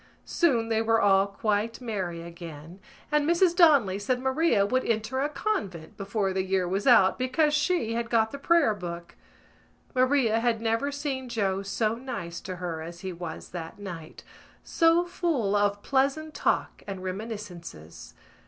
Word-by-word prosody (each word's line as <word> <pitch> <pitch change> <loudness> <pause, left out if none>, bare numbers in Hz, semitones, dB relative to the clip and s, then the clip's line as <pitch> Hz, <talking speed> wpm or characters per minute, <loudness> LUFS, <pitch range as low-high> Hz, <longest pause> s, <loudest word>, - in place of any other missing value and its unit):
Soon 245 -10 +1
they 220 -1 +2
were 225 0 +2
all 195 -1 +4
quite 210 +2 -1
merry 190 -8 -4
again 170 0 -10 0.3
and 300 +1 +2
Mrs 345 0 +3
Donnelly 280 - +5
said 250 +5 -1
Maria 265 -4 +2
would 255 +5 +1
enter 230 +3 -1
a 290 - 0
convent 200 - -3
before 200 -1 -2
the 190 - 0
year 190 -1 0
was 195 +6 -2
out 230 -6 +5
because 295 +4 +2
she 300 -6 +1
had 230 0 -2
got 220 -2 +2
the 280 - -7
prayer 330 -6 +3
book. 170 -3 -7 0.8
Maria 255 -3 +3
had 230 -1 +1
never 230 +5 0
seen 280 -3 -4
Joe 195 -4 0
so 215 +3 -1
nice 230 -9 -6
to 185 - -6
her 170 -3 -4
as 170 +2 -8
he 190 -1 -5
was 170 -2 -7
that 165 -2 -7
night, 175 -6 -9 0.4
so 335 +1 +3
full 305 - -1
of 205 0 +1
pleasant 280 +3 0
talk - - -1
and 195 -2 -6
reminiscences. 185 - -7
220 Hz, 160 wpm, -27 LUFS, 190-265 Hz, 0.8 s, Donnelly